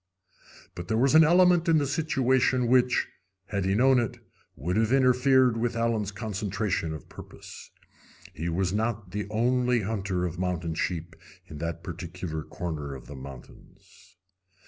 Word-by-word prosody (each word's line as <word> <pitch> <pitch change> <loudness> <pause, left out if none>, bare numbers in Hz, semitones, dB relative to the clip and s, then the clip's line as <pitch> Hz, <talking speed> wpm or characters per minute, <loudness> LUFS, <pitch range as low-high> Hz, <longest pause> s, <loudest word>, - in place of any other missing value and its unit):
But 85 -1 -7
there 110 - 0
was 135 +4 +3
an 160 +1 +8
element 175 +1 +4
in 160 - +5
the 145 - +1
situation 130 -4 +1
which, 125 +1 +3 0.4
had 100 -3 -2
he 95 +1 +1
known 130 +3 +4
it, 120 -3 -3 0.4
would 85 +8 -3
have 110 +1 +1
interfered 130 -1 +4
with 120 +1 -1
Allen's 115 -3 0
concentration 100 -4 -2
of 75 - -11
purpose. - - -12 0.6
He 80 +3 -4
was 90 +2 -1
not 110 -3 -2
the 105 0 -4
only 125 +2 +1
hunter 95 -3 -2
of 85 0 -5
mountain 90 -3 -2
sheep 85 0 -3 0.3
in 75 -4 -10
that 85 +1 -4
particular 85 -2 -6
corner 75 -4 -5
of 65 - -11
the 75 - -10
mountains. 65 -1 -14
105 Hz, 150 wpm, -27 LUFS, 85-125 Hz, 0.6 s, an